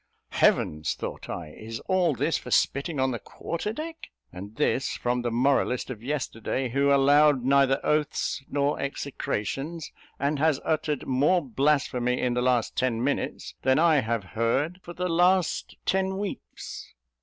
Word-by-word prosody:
"Heavens!" 75 0 +2
thought - - -6
I, 85 -3 -5
"is 110 +8 -8
all 180 -6 +1
this - - 0
for - - -10
spitting 140 +2 +1
on 130 0 +2
the 120 - -3
quarter 170 +5 -4
deck? 320 +6 -7 0.2
and 100 +4 -9
this, 135 - 0
from 125 0 0
the 120 - -1
moralist 125 +1 +1
of 110 -4 -7
yesterday, 130 -2 -2
who 140 +3 +2
allowed 140 0 +5
neither 135 0 +4
oaths 150 -2 0
nor 145 0 0
execrations, 140 +3 -3 0.3
and 140 +1 0
has 155 -2 +2
uttered 155 -2 -1
more 145 +6 +2
blasphemy 130 -2 +1
in 125 -1 0
the 125 - 0
last 125 -2 +1
ten 120 -2 0
minutes, 140 +2 -2
than 130 0 +3
I 160 -1 +5
have 115 -4 0
heard 135 +10 0
for 175 - -9
the 180 +1 -2
last 180 +1 +2
ten 190 0 +1
weeks?" 200 -1 -7
140 Hz, 155 wpm, -26 LUFS, 125-155 Hz, 0.3 s, allowed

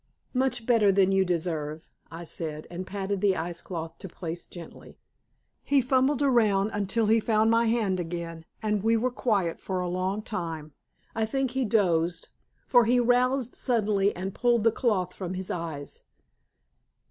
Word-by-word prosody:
"Much 250 -2 0
better 225 -4 +4
than 195 0 +3
you 195 0 +4
deserve," 160 -3 -2 0.2
I 165 +1 -8
said, 155 -2 -6
and 180 +2 -6
patted 195 0 -3
the 195 -2 +3
ice 170 +1 -4
cloth 165 -2 -6
to 195 - -7
place 170 0 -6
gently. 175 -2 -12 0.7
He 280 - +3
fumbled 265 +2 +2
around 220 -6 +3
until 205 +2 0
he 220 +2 +4
found 220 0 +2
my 230 +1 +3
hand 215 -5 +1
again, 165 -1 -5 0.2
and 210 -2 0
we 225 +2 +3
were 250 +3 0
quiet 200 -9 0
for 185 -1 -3
a 180 - -2
long 185 +4 -2
time. 165 -8 -5 0.4
I 220 -1 0
think 265 +2 -1
he 260 0 0
dozed, 175 -6 +1 0.4
for 245 -2 +5
he 245 +2 +3
roused 250 +1 +2
suddenly 210 -5 +1
and 190 +2 -4
pulled 240 -3 +2
the 225 - +5
cloth 195 -7 0
from 185 -1 -5
his 185 0 -5
eyes. 160 -5 -5
200 Hz, 165 wpm, -27 LUFS, 175-230 Hz, 0.7 s, for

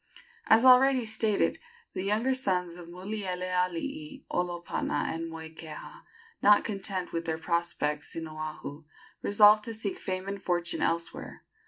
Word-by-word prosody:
As 225 +3 +6
already 255 -1 +7
stated, 220 -1 +1 0.3
the - - -3
younger 215 +7 +1
sons 185 -9 0
of 175 -1 -10
Mulielealii, 185 - -3
Olopana 175 -2 -1
and 165 0 -4
Moikeha, 160 -1 -9 0.4
not 205 0 +6
content 195 -3 -3
with 165 0 -2
their 160 -1 -1
prospects 160 -3 -1
in 165 -1 -4
Oahu, 155 -1 -7 0.4
resolved 210 +1 +6
to 230 - -4
seek 210 -3 -3
fame 185 0 -4
and 200 0 -4
fortune 175 -1 -1
elsewhere. 170 0 -2
185 Hz, 130 wpm, -29 LUFS, 165-215 Hz, 0.4 s, already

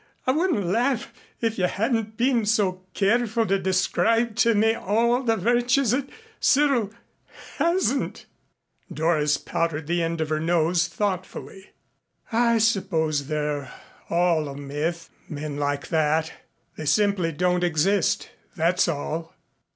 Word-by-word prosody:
I 255 - +3
wouldn't 310 - +1
laugh 235 +5 0 0.3
if 225 -2 -1
you 180 - +3
hadn't 220 +2 -1
been 240 -1 +2
so 195 -4 +1
careful 225 +2 +1
to 195 -2 +1
describe 215 +5 +1
to 230 -1 +4
me 220 +2 +3
all 230 +4 +1
the 225 -3 +1
virtues 240 +4 +2
that 270 +2 -1 0.3
Cyril 270 -7 +3 0.7
hasn't." 335 - 0 0.7
Doris 155 -2 +1
powdered 165 -2 -2
the 170 +2 0
end 165 0 -2
of 160 -1 -1
her 155 0 0
nose 170 +1 +1
thoughtfully. 190 +1 -4 0.6
"I 235 0 +3
suppose 170 - +1
they're 150 -2 -2 0.4
all 170 -3 +2
a 140 - -8
myth 150 +4 -4 0.2
men 150 -1 -5
like 145 0 -2
that. 160 0 +1 0.4
They 155 - -6
simply 200 -1 +2
don't 180 +2 0
exist 175 +4 +1 0.2
that's 175 +1 +2
all." 160 +1 -4
185 Hz, 130 wpm, -24 LUFS, 160-230 Hz, 0.7 s, to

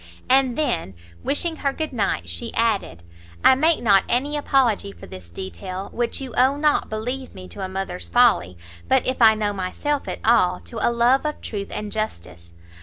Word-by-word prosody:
And 260 -1 +3
then, 285 - -1 0.3
wishing 320 +3 0
her 275 - 0
good 315 -2 -4
night, 195 - -1
she 85 0 -6
added, 85 +1 0 0.4
"I - - +8
make 315 +3 +2
not 200 -4 +5
any 280 +5 +1
apology 260 - +1
for 85 -3 -13
this 90 -2 -11
detail, 95 - -7
which 240 0 -2
you 265 -2 -7
owe, 265 +3 +3
not, 300 0 +1
believe 250 +5 -4
me, 185 -1 -9
to 195 - -7
a 190 - -4
mother's 190 - -5
folly, 85 +1 +3 0.3
but, - - +3
if 255 -1 -1
I 220 -1 +7
[know] 210 -1 -1
myself 205 +10 -2
at - - -3
all, 200 -6 +4
to 230 - -8
a - - +3
love 240 +3 +3
of 300 0 -3
truth 200 -2 -5
and 210 -1 -5
justice. 85 - -6
220 Hz, 185 wpm, -22 LUFS, 180-265 Hz, 0.4 s, I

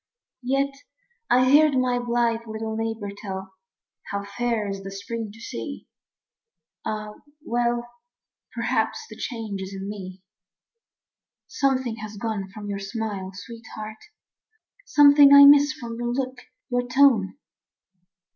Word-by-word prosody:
Yet 275 +2 0 0.6
I 255 +1 +4
heard 295 -1 +6
my 250 -1 +1
blithe 235 -1 0
little 220 0 -4
neighbor 225 -2 -3
tell 190 -2 -7 0.6
How 200 0 -3
fair 225 +1 -2
is 195 0 -4
the 195 - -7
spring 215 +3 -5
to 220 - -15
see. 270 +4 -7 1.0
Ah, 215 0 -4 0.3
well, 240 0 0 0.6
Perhaps 450 - -1
the - - -8
change 220 -5 -5
is 190 +1 -6
in 195 0 -6
me. 190 -2 -8 1.2
Something 260 -4 0
has 215 -1 -8
gone 205 -3 -3
from 205 +1 -9
your 200 -1 -3
smile, 200 -2 -4
sweetheart; 220 0 -9 0.9
Something 285 -1 +7
I 280 0 +11
miss 290 +1 +7
from 235 -6 -7
your 240 0 -1
look, 255 0 -3 0.3
your 245 0 0
tone. 250 -5 +4
230 Hz, 125 wpm, -24 LUFS, 205-255 Hz, 1.2 s, I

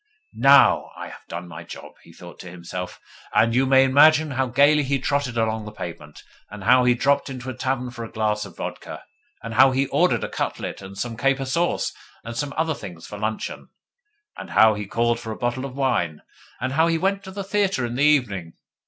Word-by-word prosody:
'NOW 140 +1 +5
I - - -7
have - - -14
done 85 +1 -7
my 85 0 -9
job!' - - -11
he - - -17
thought 85 +1 -13
to 90 - -9
himself; 90 +1 -7 0.4
and 115 +1 +4
you 130 +2 +2
may 135 0 +6
imagine 150 +3 +5
how 130 0 0
gaily 140 +4 +4
he 140 0 0
trotted 135 -2 -1
along 110 -1 -1
the 105 - -7
pavement, 85 -7 -9 0.3
and 105 -1 -9
how 125 +5 +5
he 125 0 +4
dropped 140 +3 +1
into 130 -1 -6
a - - -7
tavern 125 0 -2
for 120 -2 -7
a 115 - -8
glass 105 -1 -1
of 95 -4 -11
vodka, - - -7 0.4
and 115 0 -6
how 130 +4 +6
he 135 +1 +1
ordered - - +1
a - - -2
cutlet - - -4
and 95 0 -10
some 115 +2 -4
caper 135 +2 0
sauce 170 +6 -1 0.3
and 115 0 -7
some 140 +4 -3
other 160 0 +1
things 90 - -10
for 105 - -9
luncheon, 110 +1 -4 0.7
and - - -9
how 110 0 +5
he 105 -1 -5
called 120 +2 0
for 115 -2 -7
a 110 - -6
bottle 120 +2 -2
of 135 -2 -8
wine, 85 - -1 0.4
and 130 +2 -2
how 160 +3 +3
he 165 -1 +1
went 195 +3 0
to 190 - -9
the 195 +1 -6
theatre 195 -9 0
in 120 - -4
the 130 +4 0
evening! 105 - +1
125 Hz, 215 wpm, -23 LUFS, 105-140 Hz, 0.7 s, may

